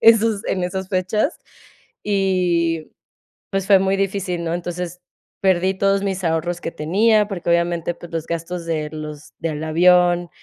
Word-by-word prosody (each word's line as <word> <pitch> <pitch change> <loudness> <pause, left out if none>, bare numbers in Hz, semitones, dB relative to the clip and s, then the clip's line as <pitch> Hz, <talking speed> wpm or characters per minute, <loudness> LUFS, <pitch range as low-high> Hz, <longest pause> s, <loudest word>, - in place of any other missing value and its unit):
esos 225 -2 +5
en 185 -2 0
esas 190 +1 -3
fechas. 195 - 0 0.7
Y, 180 -5 +1 0.6
pues, 195 -1 -1
fue 195 -1 +7
muy 195 0 +1
difícil, 190 -3 -2
¿no? 165 - -2
Entonces 175 0 -5 0.4
perdí 190 -1 +3
todos 195 +1 +2
mis 195 -1 -2
ahorros 170 +2 0
que - - -4
tenía 210 +7 +3
porque 180 -4 -5
obviamente, 170 0 +1
pues, 170 0 -12
los 165 -1 -3
gastos 170 +1 -4
de 155 -2 -2
los 150 -1 -8
del 160 -1 -3
avión, 175 +1 +4
180 Hz, 150 wpm, -21 LUFS, 170-195 Hz, 0.7 s, fue